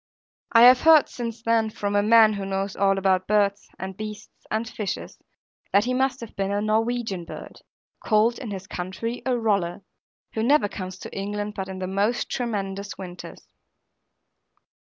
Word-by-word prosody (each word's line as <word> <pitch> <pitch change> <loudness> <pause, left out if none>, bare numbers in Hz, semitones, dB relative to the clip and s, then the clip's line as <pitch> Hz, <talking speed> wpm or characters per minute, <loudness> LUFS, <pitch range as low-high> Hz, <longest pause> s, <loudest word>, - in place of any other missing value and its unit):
I 230 0 +7
have 250 +1 +8
heard 320 -2 +7
since 230 -2 -6
then, 225 -1 +2
from 205 -1 -3
a 205 - +4
man 220 0 +6
who 200 -1 -4
knows 195 0 -3
all 195 -1 +2
about 185 -1 +1
birds, 205 -1 +1
and 190 0 -6
beasts, 215 +1 -9
and 220 +2 -1
fishes, 210 -3 -5 0.5
that 200 - +4
he 255 - 0
must 265 0 0
have 230 - -9
been 195 -1 -1
a 200 - 0
Norwegian 220 -2 -1
bird, - - -10 0.4
called 225 +2 +2
in 245 - -6
this 190 -2 -6
country 190 +7 -5
a 250 -1 +2
Roller, 200 -4 0 0.5
who 220 - -2
never 275 0 +3
comes 185 -2 -7
to - - -8
England 205 +1 -3
but 190 -2 -5
in 190 - -6
the 185 - -3
most 200 +5 -1
tremendous 200 -5 -3
winters. 180 -2 -9
210 Hz, 170 wpm, -24 LUFS, 195-230 Hz, 0.5 s, have